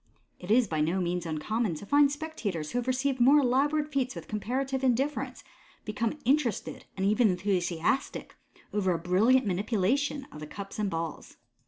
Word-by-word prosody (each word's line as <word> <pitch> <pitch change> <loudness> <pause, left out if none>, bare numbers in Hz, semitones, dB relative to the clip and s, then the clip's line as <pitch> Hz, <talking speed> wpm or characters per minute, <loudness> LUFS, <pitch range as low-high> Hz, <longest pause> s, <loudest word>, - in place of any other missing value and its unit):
It 180 - -10
is 235 +1 +4
by 155 -3 -1
no 165 +5 +1
means 175 -1 -1
uncommon 175 +5 -1
to 180 - -8
find 285 +4 +4
spectators 235 - -4
who 245 - 0
have 245 - -5
received 260 +1 0
more 265 +5 +6
elaborate 290 +4 +1
feats 265 -2 0
with - - -8
comparative 260 +5 -2
indifference, 265 +3 0 0.4
become 225 +5 -2
interested, 260 -5 0
and 190 - 0
even 215 +2 +4
enthusiastic, 180 - -1 0.4
over 190 -3 +1
a - - 0
brilliant 205 +10 +3
manipulation 225 +9 0
of 150 - -10
the 150 - -7
cups 200 +5 -8
and 210 -2 0
balls. 165 -2 -5
220 Hz, 165 wpm, -29 LUFS, 185-265 Hz, 0.4 s, more